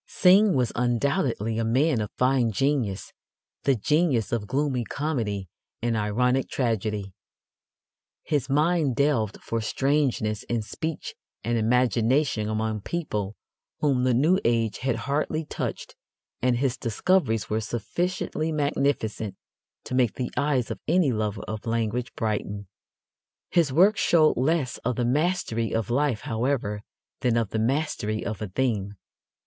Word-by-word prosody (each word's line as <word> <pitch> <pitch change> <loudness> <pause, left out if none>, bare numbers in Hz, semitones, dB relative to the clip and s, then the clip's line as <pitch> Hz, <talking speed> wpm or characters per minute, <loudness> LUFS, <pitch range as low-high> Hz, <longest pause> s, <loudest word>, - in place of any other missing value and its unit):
Synge 195 +1 +5
was 125 -3 +1
undoubtedly 120 - 0
a - - +1
man 130 +3 +2
of 105 - -3
fine 125 -2 +3
genius 120 -4 -1 0.5
the 135 - +4
genius 145 - +1
of 110 -3 -1
gloomy 135 0 0
comedy 115 -9 -2 0.3
and 120 -1 0
ironic 125 +5 +1
tragedy. 105 -5 -1 1.1
His 145 -3 -1
mind 150 -1 +2
delved 130 -7 +1
for 115 0 -2
strangenesses 130 -4 0
in 115 -2 0
speech 160 +8 -5 0.3
and 120 +2 0
imagination 120 +1 +2
among 110 0 -1
people 105 - -3 0.5
whom 135 -4 +2
the 125 -2 +3
new 160 +9 +4
age 115 -2 +1
had 130 -2 0
hardly 150 +2 -1
touched, - - -5 0.5
and 125 -1 +2
his 130 -1 0
discoveries 115 - +1
were 110 +1 +1
sufficiently 155 - -2
magnificent 135 -9 -1 0.5
to - - -7
make 125 -4 +2
the 125 -2 -3
eyes 140 -5 +1
of - - -5
any 170 -4 +3
lover 110 -2 -2
of 110 +2 -6
language 115 +2 -1
brighten. 105 -2 -2 0.8
His 165 -6 +3
work 190 +9 +5
showed 155 -3 +4
less 135 0 0
of 125 +1 -1
the 120 - 0
mastery 130 -5 0
of 115 +1 -1
life, 135 -3 +1
however, 115 -5 -1 0.4
than 120 -2 +1
of 115 -4 0
the 110 - -1
mastery 115 -4 -1
of 110 -2 -4
a 105 - -2
theme. 105 -2 -1
125 Hz, 135 wpm, -26 LUFS, 110-145 Hz, 1.1 s, Synge